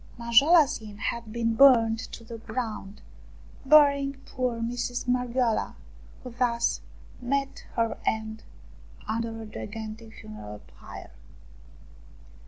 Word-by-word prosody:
Manjoala's 275 +6 +5
Inn 210 -2 -10
had 230 0 -3
been 230 0 0
burnt 230 -3 +6
to 230 - -8
the 230 0 -9
ground, 220 -3 -5 0.6
burying 280 -1 +6
poor 250 -2 -2
Mistress 245 +1 -3
Marghioala, 245 -2 0 0.5
who 250 - -7
thus 235 -1 0 0.4
met 275 +2 -2
her 230 -1 +1
end 220 0 -2 0.7
under 225 +1 -2
a - - -8
gigantic 220 +1 -8
funeral 105 -1 -10
pyre. - - -12
230 Hz, 105 wpm, -27 LUFS, 220-250 Hz, 0.7 s, burnt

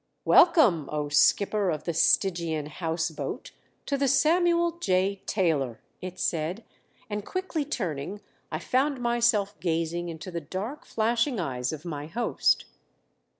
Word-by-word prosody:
"Welcome, 245 - +5
O 150 -1 -2
Skipper 200 +6 +3
of 155 -3 -2
the 170 - -2
Stygian 165 -2 +2
House 165 +1 -2
Boat, - - -6 0.3
to 280 - -1
the 275 - +2
Samuel 340 +4 +3
J. 190 - +1
Taylor!" 150 - 0 0.2
it 185 0 -7
said, 170 +7 -1 0.4
and 210 -1 -4
quickly 370 - -3
turning 190 - -4 0.3
I - - -1
found 270 +1 0
myself 235 -4 +1
gazing 170 0 -1
into 160 +2 -7
the 170 -1 -4
dark, 195 - -6
flashing 230 +2 0
eyes 130 -6 -2
of 155 0 -7
my 150 -3 -5
host. 235 +9 +1
185 Hz, 135 wpm, -27 LUFS, 160-240 Hz, 0.4 s, Welcome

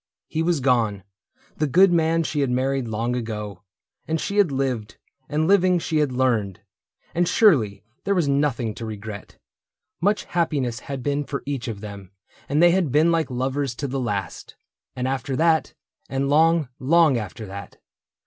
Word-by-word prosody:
— - - -70
He 160 - +2
was 165 -3 +1
gone, 115 -7 +1 0.5
The 155 - +1
good 180 +6 +5
man 165 0 +2
she 150 -1 -2
had 140 -2 +1
married 130 0 0
long 115 +3 -2
ago; 105 -5 -5 0.5
And 160 0 0
she 200 - -3
had 200 -7 +4
lived, 130 -6 -2 0.3
and 155 +2 0
living 185 -2 +4
she 160 -1 -1
had 150 -3 +2
learned, 115 -6 0 0.5
And 175 +1 +1
surely 120 - +3 0.2
there 200 0 +1
was 170 -5 +1
nothing 140 -5 0
to 115 - -7
regret: 105 -1 -8 0.6
Much 205 +4 +2
happiness 140 -9 -1
had 135 +1 -6
been 145 0 0
for 140 0 -5
each 140 -3 -3
of 105 -4 -5
them, 100 -3 -9 0.4
And 150 +4 +3
they 175 - +7
had 175 -6 +1
been 155 +5 +4
like 165 -2 +1
lovers 130 0 -2
to 140 - -3
the 135 +1 -3
last: 105 -6 -4 0.4
And 125 0 -2
after 135 0 -2
that, 160 -1 +2 0.3
and 135 +1 -1
long, 160 -1 +4
long 155 -2 +4
after 105 +1 -7
that. 100 0 -9
135 Hz, 175 wpm, -23 LUFS, 115-160 Hz, 0.6 s, they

